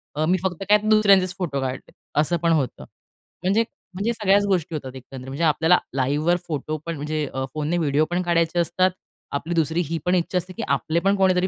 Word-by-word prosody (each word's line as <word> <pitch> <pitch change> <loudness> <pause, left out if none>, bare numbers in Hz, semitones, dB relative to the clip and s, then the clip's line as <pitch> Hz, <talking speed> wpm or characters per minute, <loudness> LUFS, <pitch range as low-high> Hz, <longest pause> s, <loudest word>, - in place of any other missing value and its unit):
अ, 155 +1 +1
मी 185 +3 +3
फक्त 185 -1 -2
काय, 210 - +8
दुसऱ्यांचेच 195 -4 +5
फोटो 150 -7 -2
काढले, 130 0 -5 0.3
असं 170 +3 +2
पण 165 - +3
होतं. 140 -7 0 0.6
म्हणजे, 200 +5 +3 0.3
म्हणजे 210 +6 -1
सगळ्याच 205 -2 +3
गोष्टी 175 -5 0
होतात, 135 -3 -6
एकंदरीत. 130 0 -10
म्हणजे 140 +5 -3
आपल्याला 160 +3 +4 0.2
लाईव्हवर 145 +6 +2
फोटो 155 0 -3
पण 165 -1 -3
म्हणजे 150 +1 -2
अ, 130 0 -2
फोनने 155 +3 -1
व्हिडिओ 150 -1 +2
पण 180 +1 +1
काढायचे 170 0 +1
असतात. 180 +2 +2 0.4
आपली 160 +4 -3
दुसरी 165 +1 +1
ही 165 - -1
पण 180 +1 +3
इच्छा 180 +1 0
असते, 180 +1 -3
की - - -5
आपले 155 +4 +1
पण 200 - +4
कोणीतरी 185 -1 +3
170 Hz, 200 wpm, -23 LUFS, 150-185 Hz, 0.6 s, काय